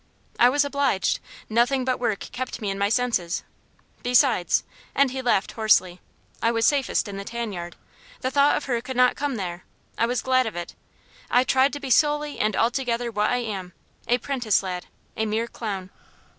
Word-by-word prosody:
"I 245 Hz, -, +7 dB
was 285 Hz, +2 st, +2 dB
obliged. 280 Hz, -8 st, +1 dB, 0.3 s
Nothing 245 Hz, +4 st, +2 dB
but 255 Hz, -1 st, 0 dB
work 225 Hz, -5 st, -1 dB
kept 255 Hz, -1 st, -4 dB
me 205 Hz, -4 st, -2 dB
in 195 Hz, -, -5 dB
my 200 Hz, 0 st, +2 dB
senses. 225 Hz, -8 st, 0 dB, 0.6 s
Besides" 245 Hz, -6 st, +3 dB, 0.3 s
and 275 Hz, -2 st, +3 dB
he 260 Hz, 0 st, -3 dB
laughed 240 Hz, -6 st, +1 dB
hoarsely 185 Hz, -5 st, +2 dB, 0.4 s
"I 230 Hz, -, +3 dB
was 230 Hz, 0 st, +1 dB
safest 275 Hz, -5 st, +2 dB
in 200 Hz, -1 st, -6 dB
the 200 Hz, -, -5 dB
tan 235 Hz, 0 st, -4 dB
yard. 175 Hz, -1 st, -6 dB, 0.5 s
The 260 Hz, -, -1 dB
thought 285 Hz, +1 st, +4 dB
of 295 Hz, -, -5 dB
her 240 Hz, -3 st, -1 dB
could 255 Hz, +1 st, -6 dB
not 250 Hz, 0 st, +5 dB
come 285 Hz, -2 st, -2 dB
there. 180 Hz, -4 st, -5 dB, 0.4 s
I 230 Hz, -, +3 dB
was 245 Hz, +1 st, -1 dB
glad 255 Hz, -2 st, +3 dB
of 220 Hz, -, -5 dB
it. 175 Hz, 0 st, -5 dB, 0.6 s
I 245 Hz, -, +4 dB
tried 265 Hz, +2 st, +3 dB
to 290 Hz, -, -4 dB
be 275 Hz, -2 st, -5 dB
solely 295 Hz, +1 st, +2 dB
and 215 Hz, -1 st, +1 dB
altogether 240 Hz, 0 st, 0 dB
what 210 Hz, -1 st, +1 dB
I 245 Hz, 0 st, 0 dB
am 190 Hz, -5 st, -5 dB, 0.3 s
a 245 Hz, -, +3 dB
'prentice 245 Hz, -5 st, 0 dB
lad 180 Hz, -1 st, -5 dB, 0.3 s
a 220 Hz, -, -1 dB
mere 220 Hz, +2 st, 0 dB
clown." 195 Hz, -5 st, -5 dB
235 Hz, 190 wpm, -24 LUFS, 205-260 Hz, 0.6 s, I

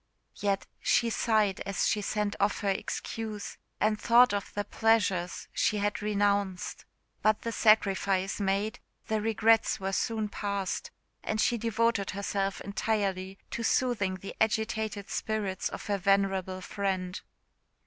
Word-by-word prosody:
Yet 200 Hz, -1 st, 0 dB
she 235 Hz, -1 st, +2 dB
sighed 215 Hz, -4 st, +2 dB
as 195 Hz, -, 0 dB
she 210 Hz, -, +1 dB
sent 210 Hz, 0 st, -1 dB
off 200 Hz, +1 st, +1 dB
her 200 Hz, -, 0 dB
excuse, 215 Hz, +2 st, -4 dB, 0.2 s
and 215 Hz, 0 st, +1 dB
thought 245 Hz, +1 st, +6 dB
of 200 Hz, -1 st, -3 dB
the 205 Hz, -, 0 dB
pleasures 205 Hz, -5 st, +1 dB
she 215 Hz, -, +1 dB
had 205 Hz, 0 st, -1 dB
renounced. 200 Hz, -2 st, 0 dB, 0.4 s
But 215 Hz, 0 st, +2 dB
the 230 Hz, -, -2 dB
sacrifice 195 Hz, -3 st, +3 dB
made, 200 Hz, +2 st, 0 dB, 0.3 s
the 215 Hz, -1 st, +1 dB
regrets 225 Hz, +1 st, +3 dB
were 195 Hz, 0 st, -2 dB
soon 220 Hz, +1 st, 0 dB
past; 200 Hz, -2 st, -3 dB, 0.3 s
and 215 Hz, -, -2 dB
she 240 Hz, -, +3 dB
devoted 230 Hz, -2 st, +1 dB
herself 195 Hz, -1 st, -1 dB
entirely 200 Hz, -2 st, -1 dB
to -, -, -3 dB
soothing 225 Hz, -5 st, +1 dB
the 190 Hz, +1 st, -8 dB
agitated 220 Hz, -2 st, 0 dB
spirits 205 Hz, -4 st, -2 dB
of -, -, -7 dB
her 200 Hz, -1 st, 0 dB
venerable 190 Hz, -1 st, +1 dB
friend. 185 Hz, -2 st, -2 dB
205 Hz, 135 wpm, -29 LUFS, 195-220 Hz, 0.4 s, thought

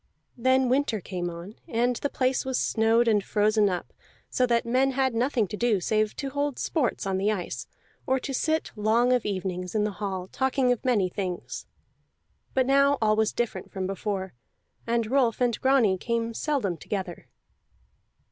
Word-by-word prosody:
Then 260 Hz, +1 st, +3 dB
winter 255 Hz, -3 st, +1 dB
came 175 Hz, -1 st, -4 dB
on, 175 Hz, +5 st, -9 dB
and 240 Hz, +1 st, +1 dB
the 285 Hz, -, -2 dB
place 260 Hz, -1 st, 0 dB
was 260 Hz, -1 st, -1 dB
snowed 225 Hz, +1 st, +2 dB
and 210 Hz, -3 st, +3 dB
frozen 210 Hz, 0 st, +2 dB
up, 180 Hz, -2 st, -4 dB, 0.4 s
so 255 Hz, -, +2 dB
that 235 Hz, -1 st, +2 dB
men 260 Hz, +3 st, +2 dB
had 260 Hz, -1 st, +1 dB
nothing 235 Hz, -2 st, +1 dB
to -, -, -4 dB
do 225 Hz, -2 st, +2 dB
save 215 Hz, +3 st, 0 dB
to 275 Hz, -2 st, -4 dB
hold 285 Hz, -1 st, -1 dB
sports 275 Hz, -11 st, -1 dB
on 190 Hz, -1 st, 0 dB
the 205 Hz, +2 st, +2 dB
ice, 150 Hz, -, -4 dB, 0.4 s
or 265 Hz, -, +3 dB
to 275 Hz, -, -4 dB
sit 315 Hz, +4 st, 0 dB
long 230 Hz, +4 st, +3 dB
of 250 Hz, -4 st, +1 dB
evenings 185 Hz, -2 st, -3 dB
in 210 Hz, -, +2 dB
the 210 Hz, -, 0 dB
hall, 190 Hz, -3 st, -3 dB
talking 265 Hz, -1 st, +1 dB
of 245 Hz, -, -1 dB
many 225 Hz, -7 st, +2 dB
things. 180 Hz, -1 st, -5 dB, 0.9 s
But 260 Hz, -1 st, +3 dB
now 275 Hz, +1 st, +4 dB
all 215 Hz, -1 st, +3 dB
was 220 Hz, 0 st, +2 dB
different 240 Hz, -1 st, -3 dB
from 190 Hz, -2 st, -3 dB
before, 195 Hz, 0 st, -3 dB, 0.5 s
and 230 Hz, 0 st, +1 dB
Rolf 245 Hz, -1 st, +2 dB
and 245 Hz, -2 st, +1 dB
Grani 245 Hz, -8 st, +3 dB
came 230 Hz, +1 st, -1 dB
seldom 235 Hz, -, -1 dB
together. 185 Hz, 0 st, -5 dB
230 Hz, 175 wpm, -26 LUFS, 200-255 Hz, 0.9 s, now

